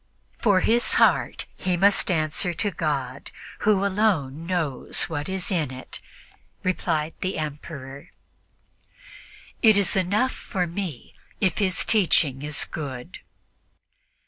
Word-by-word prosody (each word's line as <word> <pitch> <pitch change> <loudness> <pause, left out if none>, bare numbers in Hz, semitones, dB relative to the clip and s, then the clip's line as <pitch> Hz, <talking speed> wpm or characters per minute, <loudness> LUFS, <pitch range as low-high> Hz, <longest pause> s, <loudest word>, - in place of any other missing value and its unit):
"For 200 -5 +3
his 235 +5 +2
heart - - +3
he 180 -1 0
must 200 +3 +4
answer 165 +1 +1
to 205 +4 -1
God, 140 -5 -3 0.3
who 205 -2 +2
alone 175 -7 0
knows 160 -8 0
what 150 -1 -3
is 190 0 -3
in 160 -7 0
it," 130 0 -8 0.6
replied 165 -4 -1
the 185 - -2
Emperor; 140 -2 -7 1.5
"it 220 -3 +6
is 200 -2 +2
enough 200 +7 +1
for 185 -4 -3
me 170 -6 -6 0.3
if 190 0 +1
his 190 -3 +1
teaching 165 - +3
is 150 0 +1
good." 130 -5 -7
175 Hz, 120 wpm, -24 LUFS, 150-195 Hz, 1.5 s, it